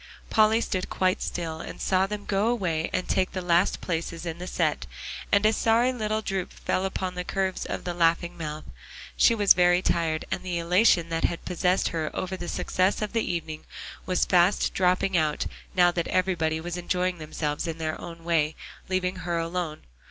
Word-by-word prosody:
Polly 220 +1 +4
stood 185 -5 -2
quite 185 0 +1
still 160 -2 -3
and - - -8
saw 190 0 +2
them 210 0 -5
go 200 +2 +1
away 180 -9 0
and 185 - -1
take 185 - +1
the 185 - -2
last 175 +1 +2
places 170 0 -3
in 165 0 -4
the 180 - -6
set, 155 - 0 0.4
and 200 +1 +4
a 215 - +5
sorry 230 +4 +3
little 215 -2 -1
droop 190 -3 -2
fell 185 - -1
upon 190 -1 -3
the 180 0 -4
curves 190 +1 -2
of - - -4
the 175 - -3
laughing 170 0 +2
mouth. 155 -2 -5 0.5
She 230 - +5
was 205 -3 +6
very 175 0 +4
tired, 160 -2 0
and - - -1
the 180 -2 -3
elation 170 0 +3
that 165 0 0
had 170 - -3
possessed 180 +1 +1
her 160 -3 -2
over 185 0 -3
the 175 -2 -6
success 185 +3 0
of 210 - -4
the 225 -5 0
evening 160 -2 -4 0.4
was 185 -1 +2
fast 180 +2 +3
dropping 185 +1 +2
out, 155 -2 +1 0.3
now 175 -1 +5
that 170 -1 -2
everybody 175 -4 +1
was 175 +2 -5
enjoying 180 0 -1
themselves 155 0 -3
in 165 -1 -3
their 155 -1 -3
own 165 -1 -9
way, 160 -2 +1 0.3
leaving 185 0 0
her 175 -1 -2
alone. 165 -1 -3
180 Hz, 190 wpm, -26 LUFS, 165-190 Hz, 0.5 s, was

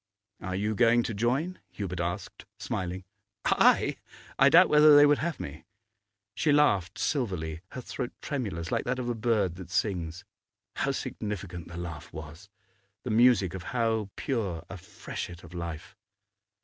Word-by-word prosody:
'Are 95 0 -3
you 105 +3 0
going 120 +2 +4
to 115 - -3
join?' 130 - 0
Hubert 90 -4 -5
asked, 85 +1 -4
smiling. 90 0 -4 0.4
'I? - - +4 0.4
I 135 - +7
doubt 175 +5 +7
whether 150 0 +7
they 145 0 +9
would 145 0 +4
have 170 0 -2
me.' 75 +3 -7 0.7
She 150 +8 +1
laughed 100 - +3
silverly, 90 - -2
her 130 - -5
throat 120 0 -5
tremulous, 100 - -4
like - - 0
that 125 +1 -1
of 125 -1 -3
a - - +1
bird 105 -6 0
that 90 -2 -9
sings. 90 -2 -2 0.5
How - - 0
significant 95 -5 -4
the 85 - -9
laugh 85 -4 -7
was! 80 +6 -10 0.5
the 125 - -3
music 110 -5 +4
of 95 - -5 0.2
how 110 -3 +1
pure 105 - -2
a 95 - -6
freshet 85 0 -7
of - - -13
life! 85 0 -6
100 Hz, 155 wpm, -28 LUFS, 85-125 Hz, 0.7 s, they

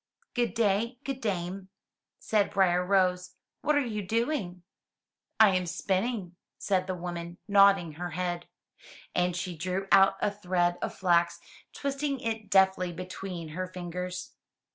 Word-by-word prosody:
"Good 240 -2 0
day, 230 +2 +1
good 270 -1 -4
dame,'' 190 -2 -3 0.5
said 210 -2 +1
Briar 180 -3 +3
rose, 180 -1 +1 0.3
"what 300 - +2
are 290 -2 +2
you 215 -3 -3
doing?" 210 - -1 0.8
"I 210 -4 +7
am 180 -1 0
spinning,'* 190 +1 -1 0.2
said 185 -2 0
the 185 - -2
woman, 175 -1 -6
nodding 195 -4 +5
her 175 +4 -5
head. 175 0 -3 0.7
And 180 0 +1
she 180 0 -3
drew 185 +4 -3
out 195 0 +6
a 205 - +1
thread 180 -3 0
of - - -3
flax, 175 -2 +2 0.3
twisting 280 0 -2
it 225 -3 -4
deftly 190 -2 +4
between 180 -1 -6
her 185 +4 -4
fingers. 180 0 -5
185 Hz, 140 wpm, -29 LUFS, 180-205 Hz, 0.8 s, I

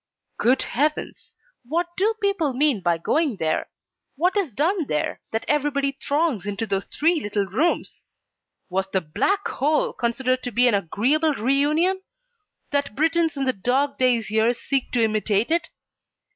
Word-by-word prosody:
Good 255 +3 +3
heavens! 300 +4 -2 0.3
What 325 +8 -1
do 425 +4 +1
people 395 - 0
mean 270 -5 +2
by 175 -2 +1
going 285 - 0
there? 160 -2 -1 0.5
What 355 +7 +1
is 390 -9 0
done 320 - 0
there, 150 0 -2
that 225 - -3
everybody 285 -1 +1
throngs 280 - -1
into 205 +2 -2
those 195 -2 -1
three 325 +1 +1
little 205 -2 -1
rooms? 225 - -1 0.6
Was 190 +1 -2
the 190 -1 0
Black 390 - 0
Hole 295 +3 0
considered 255 +2 0
to 245 - -5
be 245 +2 +4
an 240 - +3
agreeable 260 - +1
REUNION, 295 - +2 0.7
that 285 -6 -1
Britons 325 0 +1
in 275 - 0
the 260 - +2
dog 270 +7 0
days 245 -4 +2
here 220 +2 +3
seek 270 +2 -1
to 240 -2 +3
imitate 215 +2 +1
it? 335 +1 +1
270 Hz, 155 wpm, -23 LUFS, 220-310 Hz, 0.7 s, be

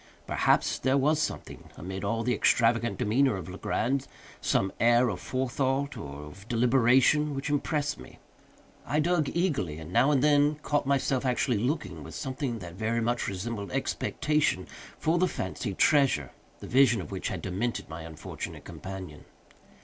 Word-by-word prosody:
Perhaps - - +2
there 130 +2 +2
was 150 +3 +2
something, - - -5
amid 95 +2 -6
all 115 +3 -1
the 125 - +1
extravagant 115 +1 +2
demeanor 125 +1 +2
of 90 -4 -6
Legrand—some 110 0 -2
air 120 +1 +4
of 100 - -4
forethought, 135 +2 -1
or 70 +1 -7
of 95 +8 -12
deliberation, 130 +4 +3
which 135 +2 -3
impressed 145 0 -1
me. - - -12 0.7
I 150 +5 0
dug 155 -2 +2
eagerly, 145 - 0
and 80 +2 -9
now 135 - +4
and 140 -3 +3
then 145 0 +4
caught 145 -2 0
myself 135 -1 +1
actually 125 -3 +1
looking, 130 +9 -2
with - - -9
something 130 -3 -3
that 85 -5 -8
very 110 +5 -1
much 120 +1 0
resembled 100 0 -4
expectation, 150 -9 0 0.3
for 165 +2 +1
the 185 - +3
fancied 95 - -4
treasure, 135 - +3 0.3
the - - -7
vision 125 -3 +4
of 95 - -7
which 95 - -3
had - - -4
demented 100 +5 -2
my 80 +1 -7
unfortunate 80 -2 -7
companion. 95 -5 -8
120 Hz, 155 wpm, -28 LUFS, 95-140 Hz, 0.7 s, air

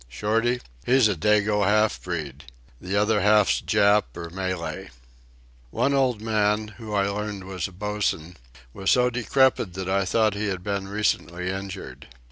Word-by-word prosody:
Shorty? 115 - 0 0.2
He's 130 -2 +4
a 105 - +1
dago 105 +3 +2
half 105 +2 +2
breed. 75 -6 -5 0.4
The 95 +2 -2
other 105 0 +2
half's 105 0 +4
Jap 100 0 +3
or 85 -1 -7
Malay." 95 -1 -4 0.8
One 140 - 0
old 125 -5 +1
man, 105 -1 +1
who 110 -2 -8
I 100 -1 +2
learned 105 -1 -4
was 95 -2 -4
a - - -13
bosun, 95 -3 -3 0.4
was 95 0 -2
so 125 0 +4
decrepit 120 -5 +1
that 95 -1 -4
I 100 0 +1
thought 110 +2 +2
he 105 +1 -2
had 95 -3 -3
been 100 -1 -3
recently 95 -3 -1
injured. 95 -9 -7
100 Hz, 155 wpm, -24 LUFS, 95-105 Hz, 0.8 s, He's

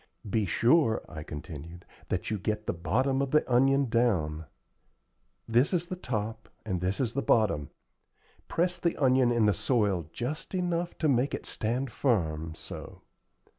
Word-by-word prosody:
"Be 105 0 0
sure," 120 - +3
I 80 -2 -8
continued, 80 +2 -8 0.2
"that 90 +3 -2
you 105 - -1
get 105 +3 -2
the - - -1
bottom 130 +11 +1
of 140 - 0
the 150 +3 +3
onion 135 +3 +4
down. 90 -10 +1 1.0
This 120 +9 +3
is 175 -1 0
the 185 - -2
top, 110 - -4 0.2
and 95 -5 -2
this 95 +2 -1
is 120 -4 0
the 140 - 0
bottom. 100 - +2 0.8
Press 175 +1 0
the 170 - 0
onion 130 -3 +4
in 120 -2 +3
the 105 - +4
soil 100 - 0
just 150 +9 -4
enough 175 -1 -1
to 160 - +1
make 135 0 +2
it - - -8
stand 120 +4 -2
firm, 80 - 0
so. - - -9
115 Hz, 160 wpm, -29 LUFS, 90-135 Hz, 1.0 s, onion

